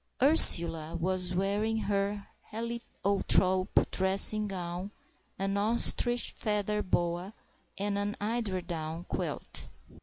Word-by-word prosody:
Ursula 170 - +7
was 180 +1 -2
wearing 205 +4 -2
her 200 0 -4 0.2
heliotrope 200 -4 -1
dressing 195 +3 +4
gown, 180 0 -7 0.5
an 195 +1 -3
ostrich 235 +3 +1
feather 210 0 -3
boa, 175 +2 -4 0.4
and 200 +1 -3
an 205 +1 -5
eiderdown 180 -7 -5
quilt. - - -5
195 Hz, 90 wpm, -28 LUFS, 180-210 Hz, 0.5 s, Ursula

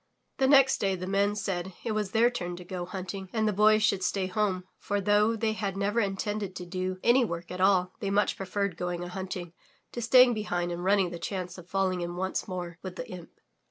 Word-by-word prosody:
The 265 - +4
next 270 -1 +6
day 195 -1 +1
the 185 0 -5
Men 200 +2 +1
said 190 -3 -3
it 230 - -2
was 215 -2 -1
their 230 +4 +3
turn 175 -6 -4
to 180 - -9
go 180 0 -4
hunting 190 0 -6
and 220 -1 +1
the 210 - +1
Boy 215 +2 +5
should 200 -3 +1
stay 190 +1 0
home, 190 -1 0 0.2
for, 205 0 -1
though 210 +3 +3
they 220 0 0
had 200 -3 -3
never 205 +3 +1
intended 200 -1 -2
to 180 - -6
do 185 +1 -3
any 245 +2 +5
work 170 -5 -4
at 180 0 -4
all, 185 -1 +4
they 200 -4 -2
much 205 +1 +2
preferred 195 -1 -2
going 175 0 -3
a 175 - -6
hunting 180 -2 -5 0.4
to 240 - -5
staying 250 +1 +6
behind 175 -5 -2
and 175 0 -4
running 190 -2 +3
the 170 - -6
chance 180 +1 -4
of 180 0 -14
falling 190 -2 0
in 175 0 -4
once 190 +1 -2
more 175 -2 -5
with 185 -1 -7
the - - -6
imp. 180 -2 -9
195 Hz, 230 wpm, -28 LUFS, 180-210 Hz, 0.4 s, next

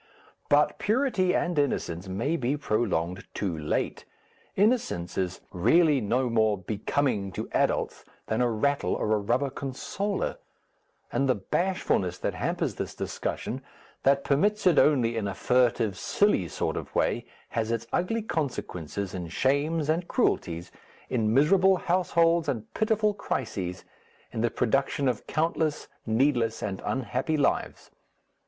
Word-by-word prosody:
But 145 +1 +3
purity 215 -5 +2
and 175 -3 +1
innocence 95 -10 -1
may 115 - -1
be 135 -1 0
prolonged 100 - -1
too 95 -5 -1
late; 75 -1 -2 0.5
innocence 205 - +1
is 95 -1 -2
really 150 - +4
no 125 +5 +1
more 110 -3 +2
becoming 105 +2 -1
to - - -4
adults - - 0 0.2
than 110 +2 0
a 125 - +3
rattle 140 +6 +1
or 110 - 0
a 105 - +2
rubber 120 +7 0
consoler, 165 +10 -3 0.7
and 135 -1 +1
the 130 - +4
bashfulness 100 - 0
that - - -2
hampers - - -1
this - - -5
discussion, - - -4 0.4
that 140 0 +3
permits 205 +10 +1
it 180 -4 +6
only 125 -6 +3
in 110 -3 -1
a 100 - -4
furtive 120 -5 +2
silly 200 - +2
sort - - -2
of - - -7
way, - - +1 0.2
has 115 -1 -1
its 115 0 -1
ugly 220 +6 0
consequences 100 - -3
in 90 -2 -4
shames 145 - +1
and 165 +3 0
cruelties, 85 +1 0 0.4
in 110 -4 +1
miserable 185 - +5
households 170 -3 +2
and 115 -6 -4
pitiful 215 -1 +2
crises, 95 - -3 0.5
in 110 - -3
the 120 - +2
production 135 +4 +1
of 125 -4 -1
countless, 155 -1 0 0.2
needless, 115 -1 +1
and 95 -2 -3
unhappy 135 +4 -1
lives. 140 - -1
130 Hz, 135 wpm, -27 LUFS, 105-160 Hz, 0.7 s, it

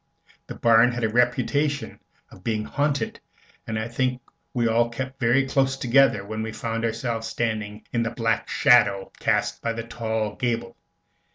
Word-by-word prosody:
The - - -7
barn 115 +1 +5
had 120 -1 -3
the 110 - +2
reputation 130 +5 0 0.3
of 90 - -15
being 110 -1 -1
haunted, 145 +2 -1 0.5
and 110 - -2
I 110 +1 -2
think 125 +1 -1 0.3
we 120 -2 +1
all 115 +1 +2
kept 130 +3 -6
very 130 +2 +3
close 135 0 +1
together 120 -5 +3
when 110 +1 -4
we 110 0 -3
found 115 0 -3
ourselves 115 0 -2
standing 110 -3 -3
in 120 - +1
the 115 - 0
black 115 -2 -1
shadow 100 -5 +4
cast - - 0
by 115 - -1
the 115 0 -5
tall 110 -2 -3
gable. 120 -3 -2
115 Hz, 165 wpm, -24 LUFS, 110-125 Hz, 0.5 s, barn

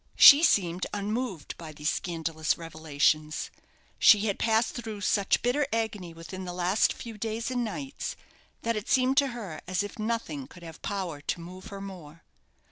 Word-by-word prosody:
She 285 +1 +10
seemed 185 - +2
unmoved 205 - -3
by 160 -2 -8
these 150 +1 -1
scandalous 165 -3 -1
revelations. 155 -1 0 0.5
She 210 -2 +7
had 205 -2 -1
passed 225 0 +2
through 220 -4 -6
such 200 0 +2
bitter 270 +4 +2
agony 220 -6 -2
within 165 +3 -8
the 180 -1 -5
last 180 +3 +2
few 225 -3 -8
days 225 +3 -2
and 245 -1 0
nights, 270 +5 -4 0.5
that 230 0 0
it 210 0 -4
seemed 260 +1 +3
to 280 -1 +5
her 220 -11 -6
as 185 +2 0
if 205 +2 -8
nothing 215 - -2
could 175 - -14
have 165 -2 -10
power 185 -7 -3
to 160 - -2
move 180 +2 -10
her 200 -1 -8
more. 170 -5 -10
195 Hz, 170 wpm, -28 LUFS, 165-225 Hz, 0.5 s, She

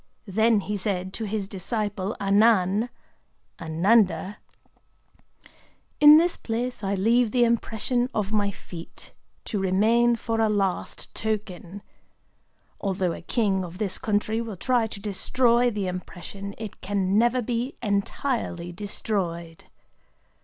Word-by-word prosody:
Then 220 +1 +3
he 205 +1 -3
said 190 -1 -2
to 225 - -4
his 205 -1 -2
disciple 205 0 -3
Anan 205 +1 +3 0.7
[Ânanda]: 185 +2 +2 1.6
'In 295 +1 +10
this 345 +2 +2
place 235 0 -3
I 195 +1 0
leave 230 +4 +3
the 245 +2 +3
impression 235 +1 0
of 210 -4 -2
my 205 -2 +1
feet, 175 -3 -11 0.3
to 210 - -2
remain 220 +6 +3
for 225 -1 -2
a 220 - +3
last 195 -3 -2
token. 205 -3 -4 1.0
Although 190 -3 -1
a - - -8
king 195 0 0
of 180 0 -8
this 195 -3 -2
country 215 +1 0
will 225 -3 -6
try 240 +3 +1
to 210 - -8
destroy 235 +4 +2
the 210 -4 -3
impression, 185 +2 -6
it 220 -2 -8
can 195 0 +1
never 240 +2 +2
be 240 +3 -2
entirely 200 -3 -2
destroyed. 175 -4 -4
210 Hz, 125 wpm, -25 LUFS, 190-230 Hz, 1.6 s, In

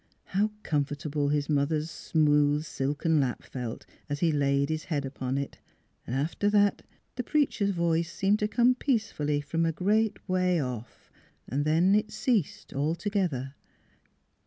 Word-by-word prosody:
How 205 +3 +1
comfortable 145 0 -1
his 145 -1 0
mother's 150 +2 0
smooth 150 -1 +2
silken 150 +3 0
lap 130 -3 -1
felt 125 -3 -6 0.2
as 145 0 -2
he 170 -2 +3
laid 140 -1 +1
his 155 0 -2
head 145 -5 -2
upon 130 -1 -3
it! 140 0 -4 0.5
After 145 - 0
that 205 -1 +3 0.4
the 250 - -1
preacher's 260 -8 +1
voice 170 -2 0
seemed 200 +2 +1
to 210 - +1
come 245 +3 +4
peacefully 215 - 0
from 165 +3 -1
a 165 - +2
great 210 +6 0
way 185 -1 +2
off: 125 -4 -6 0.4
then 155 - +2
it 210 +1 +2
ceased 215 - -1
altogether. 160 -2 -1
155 Hz, 135 wpm, -28 LUFS, 145-200 Hz, 0.5 s, come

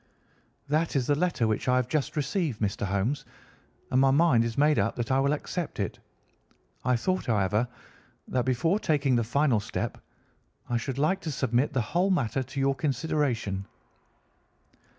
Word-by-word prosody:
"That 155 +3 0
is 130 -3 +2
the 145 - +2
letter 150 -5 +1
which 110 +2 -1
I 125 - +4
have 130 -1 +1
just 140 +1 -1
received, 150 - -1
Mr. 100 -1 -1
Holmes, 100 +9 -1 0.7
and 130 - +4
my 135 - +5
mind 135 -4 +4
is 115 -1 -3
made 150 +1 +4
up - - 0
that 120 +1 -3
I 130 - +3
will 140 +1 +2
accept 150 +1 -3
it. 100 - -3 0.8
I 125 - +2
thought, 185 +10 -1
however, 105 +1 +1 0.6
that 125 -1 0
before 160 - +1
taking 145 -8 +2
the 120 - +2
final 130 0 +2
step 100 - -4 0.7
I 120 - 0
should 130 +2 -4
like 155 +7 +1
to 155 - -3
submit 130 0 +1
the 130 - +1
whole 175 - +1
matter 135 - +1
to 130 +2 -6
your 135 0 +2
consideration." 130 -8 -1
135 Hz, 170 wpm, -28 LUFS, 115-150 Hz, 0.8 s, my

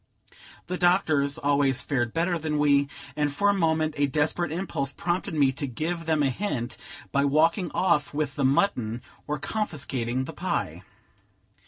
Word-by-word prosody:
The 180 +1 -4
doctors 160 -6 +2
always 140 -3 +2
fared 120 -4 0
better 170 +3 0
than 155 -1 -1
we; 140 -1 +4 0.3
and 150 -1 +1
for 200 +8 +2
a - - +4
moment 160 -4 +1
a 145 0 +3
desperate 150 +3 0
impulse 160 -5 -2
prompted 175 +3 -2
me 140 -3 +4
to 140 +1 -4
give 165 +6 -3
them 155 -2 +2
a 135 - +2
hint, 130 - -3 0.4
by 140 - +2
walking 165 +6 +2
off 150 -6 +2
with 145 -1 -2
the 140 - -1
mutton, 130 - +1 0.2
or 150 - -1
confiscating 135 - -2
the - - -7
pie. - - -2
150 Hz, 160 wpm, -26 LUFS, 140-165 Hz, 0.4 s, we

